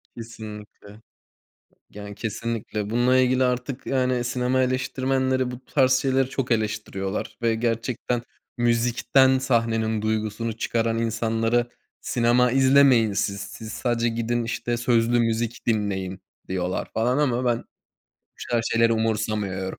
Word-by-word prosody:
Kesinlikle. 105 -2 -10 0.9
Yani, 105 0 -9
kesinlikle 110 -1 -4
bununla 120 +3 +3
ilgili 130 0 +3
artık, 125 +1 -2
yani, 130 -2 0
sinema 125 +2 0
eleştirmenleri 130 0 0
bu 125 +1 -9
tarz 130 -3 +2
şeyleri 130 0 +2
çok 135 -2 -3
eleştiriyorlar. 105 -3 -2
Ve 115 -1 +2
gerçekten 115 +1 -2 0.4
müzikten 120 +3 +3
sahnenin 115 -4 0
duygusunu 110 +1 -2
çıkaran 115 0 0
insanlara, 115 +1 0 0.3
"Sinema 120 +1 +2
izlemeyin 130 -4 +5
siz, 100 0 -1
siz 105 +2 -8
sadece 120 -1 0
gidin, 115 +1 -1
işte, 120 +1 -2
sözlü 120 0 +2
müzik 115 0 -1
dinleyin." 95 -4 -1 0.3
diyorlar, 90 0 -2
falan, 125 +4 +1
ama 130 -4 +1
ben 120 -2 +2
bu - - -19 0.7
tarz 115 -1 +1
şeyleri 115 0 +4
umursamıyorum. 105 -4 -2
115 Hz, 120 wpm, -24 LUFS, 110-125 Hz, 0.9 s, izlemeyin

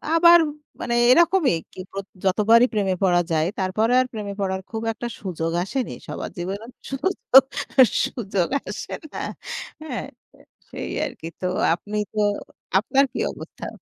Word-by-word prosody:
আবার 340 +1 +8 0.4
মানে 235 - -2 0.2
এরকমই 340 - +4 0.7
যতবারই 225 +6 +5
প্রেমে 195 -3 +1
পড়া 175 -2 +4
যায়। 155 0 +2
তারপরে 215 +5 +1
আর - - 0
প্রেমে 205 -2 -4
পড়ার 190 -1 -1
খুব 225 -1 -3
একটা 240 +2 -5
সুযোগ 165 -4 -3
আসেনি। 250 +6 -3
সবার - - -5
জীবনের 200 +7 -5 0.2
সুযোগ, 270 -3 +4 0.6
সুযোগ 195 -7 -2 0.2
আসে - - -6 0.2
না। - - -4 0.6
হ্যাঁ, 315 - -4 0.6
সেই - - -6
আরকি। 165 - -7
তো 185 - 0 0.3
আপনি 210 +4 -6 0.2
তো 215 - -2 0.6
আপনার 270 +6 +3
কি - - -4
অবস্থা? - - -9
215 Hz, 130 wpm, -23 LUFS, 190-255 Hz, 0.7 s, আবার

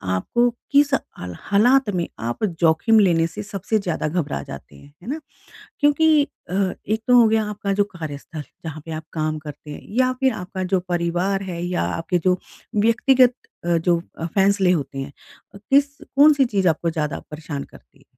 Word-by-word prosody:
आपको 240 - +1 0.2
किस 285 0 +4
अल 90 - -3
हालात 240 +5 +3
में 170 -1 -1 0.2
आप 120 - -4
जोखिम 170 +5 +3
लेने 170 -5 +4
से 210 +4 -7
सबसे 210 +1 -2
ज़्यादा 175 -5 -2
घबरा 150 - -2
जाते - - -10
हैं? 145 - -17
है - - -13
ना? 305 - -2 0.6
क्योंकि 300 +1 +4 0.3
अ, 180 - -3 0.3
एक 220 +1 0
तो 250 0 +5
हो 230 - +6
गया 220 0 +2
आपका 200 -1 -3
जो 200 +1 +2
कार्यस्थल 155 0 -7
है 150 - -5 0.2
जहाँ 155 -1 -6
पे - - -7
आप 160 - -25
काम 155 -1 -1
करते 150 0 -10
हैं 145 - -7 0.2
या 255 0 +3
फिर 265 -1 +3
आपका 185 -1 -5
जो 185 - +3
परिवार 175 +3 0
है 170 -1 -5
या 180 0 -1
आपके 175 +2 -1
जो 180 - +3 0.4
व्यक्तिगत 245 +3 +4 0.3
अ, 170 0 +2
जो 170 0 +1 0.3
फैसले 195 -1 +3
होते 140 -4 -2
हैं 135 +1 -5 0.5
किस 280 +6 +2
कौन-सी 290 -1 +5
चीज़ 195 -7 +1
आपको 165 +1 0
ज़्यादा 150 -3 -3
परेशान 150 -2 -6
करती - - -19
है? - - -24
185 Hz, 180 wpm, -22 LUFS, 160-230 Hz, 0.6 s, हो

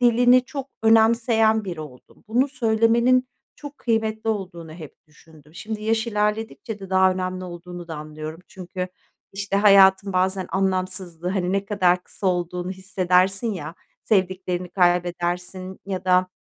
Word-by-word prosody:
dilini 245 +1 +5
çok 275 +1 -6
önemseyen 225 0 +4
biri 175 -4 -5
oldum. 135 -5 -13
Bunu 250 +5 +2
söylemenin 235 0 +2 0.3
çok 290 -1 -10
kıymetli 225 -1 -1
olduğunu 175 -6 -5
hep 155 -3 -10
düşündüm. 155 0 -20
Şimdi 215 +3 -6
yaş 225 +1 0
ilerledikçe 215 +1 -2
de 195 -1 -10
daha 190 0 +4
önemli 185 0 -4
olduğunu 175 0 -9
da 160 - -5
anlıyorum 155 +2 -8
çünkü, 185 0 -6 0.4
işte, 195 0 -2
hayatın 195 -1 +6
bazen 185 0 0
anlamsızlığı, 185 -2 -2
hani, 185 -1 -1
ne 200 0 0
kadar 180 -3 +1
kısa 195 - -6
olduğunu 180 0 -1
hissedersin 190 +3 +1
ya, 160 -4 -6 0.3
sevdiklerini 185 -2 0
kaybedersin 180 +1 -1
ya 190 -2 -4
da, 185 0 +3
190 Hz, 135 wpm, -23 LUFS, 180-220 Hz, 0.4 s, hayatın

